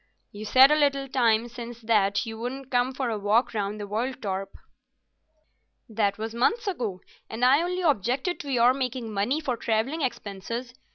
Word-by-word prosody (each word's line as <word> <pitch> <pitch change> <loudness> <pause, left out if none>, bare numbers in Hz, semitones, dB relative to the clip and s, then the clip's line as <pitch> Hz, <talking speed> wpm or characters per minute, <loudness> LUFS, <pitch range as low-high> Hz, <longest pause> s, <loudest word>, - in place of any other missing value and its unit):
"You 210 +1 -8
said 260 +6 +7
a - - +5
little 280 -2 +1
time 235 -3 +2
since 240 0 -8
that 205 -2 +2
you 225 -1 -7
wouldn't 260 +3 -6
come 245 +1 +2
for 255 -2 -2
a 215 - -2
walk 210 +5 +2
round 210 0 -2
the 205 - -4
world, 235 +6 -3
Torp." 195 -2 -3 1.4
"That 210 -3 0
was 220 +1 -5
months 445 - +1
ago, 235 - -3 0.3
and 230 +3 0
I 275 +5 +5
only 360 +1 -2
objected 270 - 0
to 285 - -6
your 245 0 +4
making 250 -4 -3
money 210 +9 0
for 270 -6 -2
travelling 230 +8 -1
expenses. 235 0 -4
240 Hz, 175 wpm, -26 LUFS, 215-265 Hz, 1.4 s, said